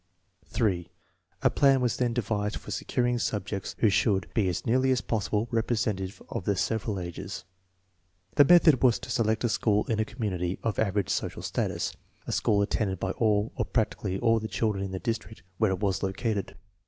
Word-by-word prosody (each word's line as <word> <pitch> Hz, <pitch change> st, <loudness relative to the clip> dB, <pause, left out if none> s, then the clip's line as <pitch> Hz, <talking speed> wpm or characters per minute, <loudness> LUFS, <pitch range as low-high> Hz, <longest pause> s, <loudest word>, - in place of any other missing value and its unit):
3. 90 Hz, -6 st, 0 dB, 0.5 s
A -, -, +6 dB
plan 135 Hz, -1 st, +4 dB
was 125 Hz, -2 st, 0 dB
then 125 Hz, -1 st, +1 dB
devised 105 Hz, -3 st, -1 dB
for -, -, -8 dB
securing 120 Hz, +4 st, 0 dB
subjects 100 Hz, -3 st, -3 dB
who 110 Hz, -, +4 dB
should 95 Hz, -2 st, +2 dB
be 105 Hz, -5 st, +2 dB
as 85 Hz, -, -3 dB
nearly 130 Hz, +3 st, +2 dB
as 130 Hz, -1 st, +3 dB
possible 110 Hz, -1 st, -1 dB
representative 110 Hz, -4 st, -1 dB
of 95 Hz, -, -5 dB
the 100 Hz, -, +1 dB
several 105 Hz, 0 st, -1 dB
ages. 85 Hz, -2 st, -6 dB, 0.9 s
The 145 Hz, -, +7 dB
method 160 Hz, -5 st, +6 dB
was 125 Hz, -3 st, +5 dB
to -, -, -8 dB
select 110 Hz, -2 st, +1 dB
a 120 Hz, -, +2 dB
school 105 Hz, -1 st, +2 dB
in 110 Hz, -2 st, -1 dB
a -, -, +3 dB
community 95 Hz, -7 st, -3 dB
of 115 Hz, -2 st, -1 dB
average 100 Hz, -2 st, +1 dB
social -, -, -2 dB
status, -, -, -2 dB, 0.3 s
a -, -, -4 dB
school 100 Hz, -1 st, +2 dB
attended 100 Hz, -2 st, -1 dB
by -, -, -1 dB
all 105 Hz, -1 st, +1 dB
or -, -, 0 dB
prac 110 Hz, -4 st, 0 dB
tically 95 Hz, -2 st, -3 dB
all 115 Hz, -1 st, +3 dB
the 110 Hz, -, -4 dB
children 105 Hz, -3 st, -1 dB
in 95 Hz, -, -4 dB
the 95 Hz, -, -3 dB
district 110 Hz, 0 st, -4 dB, 0.2 s
where 110 Hz, -2 st, +3 dB
it 95 Hz, +1 st, -2 dB
was 95 Hz, -2 st, 0 dB
located. 100 Hz, +1 st, -2 dB
110 Hz, 190 wpm, -28 LUFS, 100-115 Hz, 0.9 s, The